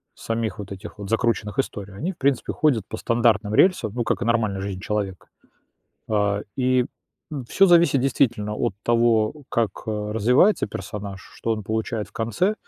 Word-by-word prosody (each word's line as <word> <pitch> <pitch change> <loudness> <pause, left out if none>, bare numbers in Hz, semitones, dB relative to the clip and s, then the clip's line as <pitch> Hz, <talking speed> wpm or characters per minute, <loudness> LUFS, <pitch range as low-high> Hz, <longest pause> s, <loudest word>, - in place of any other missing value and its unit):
самих 115 -1 -3
вот 100 0 -7
этих 100 +2 -8
вот 100 - -6
закрученных 115 +1 0
историй. 100 -7 -3
Они, 160 - -2
в - - -30
принципе, 140 -1 +1
ходят 130 -10 +2
по 110 - -5
стандартным 115 -3 +2
рельсам, 120 - +3
ну, 120 - 0
как - - -1
и - - -1
нормальная 110 -4 +1
жизнь 95 -1 -4
человека, 100 -3 -3 0.8
а, 105 -1 +1
и, 130 -1 +2 0.5
м, 140 -4 -4
всё 195 - +4
зависит 170 -6 +5
действительно 120 -5 +1
от 105 - -1
того, 115 0 +3 0.2
как, 115 -3 +1 0.2
э, 105 -1 -2
развивается 125 - +4
персонаж, 100 0 -6
что 115 - -3
он 110 -2 -4
получает 110 0 -2
в - - -24
конце, 115 - 0
110 Hz, 170 wpm, -23 LUFS, 105-125 Hz, 0.8 s, зависит